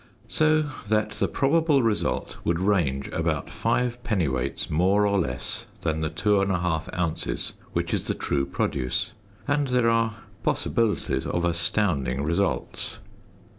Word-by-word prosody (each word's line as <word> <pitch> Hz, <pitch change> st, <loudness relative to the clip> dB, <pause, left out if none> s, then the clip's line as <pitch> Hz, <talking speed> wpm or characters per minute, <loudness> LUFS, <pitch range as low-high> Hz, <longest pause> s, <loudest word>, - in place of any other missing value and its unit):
So 155 Hz, +2 st, +3 dB, 0.3 s
that 110 Hz, 0 st, +2 dB
the -, -, 0 dB
probable 150 Hz, -1 st, +3 dB
result 110 Hz, -2 st, 0 dB
would 85 Hz, 0 st, +1 dB
range 85 Hz, -9 st, +1 dB
about -, -, -1 dB
5 125 Hz, 0 st, 0 dB
dwts. 75 Hz, -, -1 dB
more 95 Hz, +6 st, +3 dB
or 100 Hz, -1 st, +2 dB
less 65 Hz, -8 st, -2 dB
than 80 Hz, -1 st, -1 dB
the 80 Hz, -, 0 dB
2 95 Hz, +5 st, +2 dB
1/2 90 Hz, -4 st, 0 dB
ozs., 85 Hz, -8 st, -1 dB, 0.2 s
which -, -, -1 dB
is -, -, -1 dB
the -, -, 0 dB
true 70 Hz, -1 st, -1 dB
produce, 105 Hz, -, -1 dB, 0.4 s
and 145 Hz, 0 st, +2 dB
there 125 Hz, -2 st, +3 dB
are 115 Hz, -1 st, +1 dB, 0.3 s
possibilities 115 Hz, -3 st, 0 dB
of 85 Hz, 0 st, 0 dB
astounding 85 Hz, -6 st, +1 dB
results. 85 Hz, +6 st, -1 dB
95 Hz, 135 wpm, -26 LUFS, 80-115 Hz, 0.4 s, So